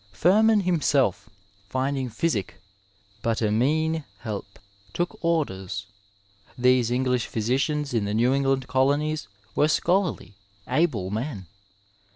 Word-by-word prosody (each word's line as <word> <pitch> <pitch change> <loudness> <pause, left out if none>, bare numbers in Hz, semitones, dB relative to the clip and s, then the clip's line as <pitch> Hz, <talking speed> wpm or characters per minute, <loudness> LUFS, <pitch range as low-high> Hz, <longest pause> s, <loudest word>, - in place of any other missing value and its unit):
Firman 215 +4 +4
himself, 145 - +1 0.4
finding 130 0 -1
physio 115 - 0 0.4
" 100 +1 -35
but 115 -1 0
a 110 -2 +1
meane 155 +7 +1 0.2
helpe," 100 -2 -6 0.4
took 175 +1 -3
orders. 100 - -1 0.7
These 125 -1 +3
English 125 -1 0
phy - - -4
sicians 140 +5 0
in 110 -3 +1
the 100 - -2
New 120 +4 +3
England 135 -1 +1
colonies 145 +2 +1 0.3
were 150 - +4
scholarly, 175 - 0 0.3
able 120 - 0
men. 110 -3 -4
130 Hz, 120 wpm, -25 LUFS, 110-155 Hz, 0.7 s, Firman